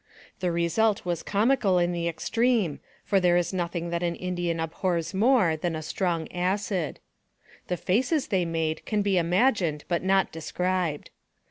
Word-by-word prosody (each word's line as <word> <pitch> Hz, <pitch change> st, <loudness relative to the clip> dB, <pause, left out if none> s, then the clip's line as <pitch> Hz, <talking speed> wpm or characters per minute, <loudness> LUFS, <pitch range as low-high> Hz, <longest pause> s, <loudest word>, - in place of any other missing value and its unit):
The 180 Hz, -1 st, 0 dB
result 180 Hz, +6 st, +1 dB
was 175 Hz, -2 st, -1 dB
comical 210 Hz, -2 st, +2 dB
in 175 Hz, 0 st, +2 dB
the 170 Hz, -1 st, -2 dB
extreme, 215 Hz, -, 0 dB, 0.3 s
for 195 Hz, -, +3 dB
there 175 Hz, -1 st, +3 dB
is 175 Hz, +2 st, 0 dB
nothing 170 Hz, -1 st, -2 dB
that 170 Hz, 0 st, -1 dB
an 170 Hz, -1 st, -1 dB
Indian 175 Hz, -2 st, -2 dB
abhors 165 Hz, +2 st, -2 dB
more 215 Hz, -5 st, +3 dB
than 165 Hz, +1 st, -2 dB
a 155 Hz, -, -5 dB
strong 170 Hz, -1 st, -1 dB
acid. 185 Hz, -1 st, -1 dB, 0.7 s
The 180 Hz, -, -1 dB
faces 255 Hz, -, 0 dB
they 190 Hz, -4 st, +2 dB
made 160 Hz, -2 st, -2 dB
can 210 Hz, -2 st, +1 dB
be 195 Hz, -2 st, +2 dB
imagined 175 Hz, -, +1 dB
but 170 Hz, -1 st, 0 dB
not 190 Hz, 0 st, +2 dB
described. 175 Hz, -1 st, -2 dB
180 Hz, 155 wpm, -26 LUFS, 170-195 Hz, 0.7 s, for